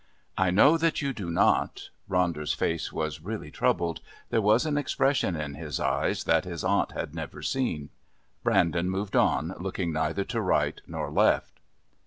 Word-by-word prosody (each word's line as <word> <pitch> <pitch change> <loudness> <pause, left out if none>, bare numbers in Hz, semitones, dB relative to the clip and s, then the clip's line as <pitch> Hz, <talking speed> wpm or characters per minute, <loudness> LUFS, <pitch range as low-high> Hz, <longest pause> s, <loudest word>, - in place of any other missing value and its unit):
"I 95 -1 +2
know 140 - +5
that 165 -2 +1
you 140 -1 -1
do 100 -7 -5
not." 85 - +1 0.2
Ronder's 85 -5 +1
face 80 0 -1
was 80 -1 -3
really 95 -5 -6
troubled; 85 +1 0 0.3
there 110 - +3
was 110 +7 +4
an 155 -2 0
expression 135 -8 +1
in 75 -2 -4
his 75 +1 -5
eyes - - 0
that - - +3
his - - -6
aunt - - +1
had - - -4
never - - -7
seen. 80 - -1 0.5
Brandon 85 +1 +2
moved 95 +1 -3
on, 80 +4 +2
looking 90 -2 -2
neither 80 +5 0
to 115 +2 -2
right 95 - +1
nor - - -4
left. - - +2
90 Hz, 165 wpm, -27 LUFS, 80-110 Hz, 0.5 s, know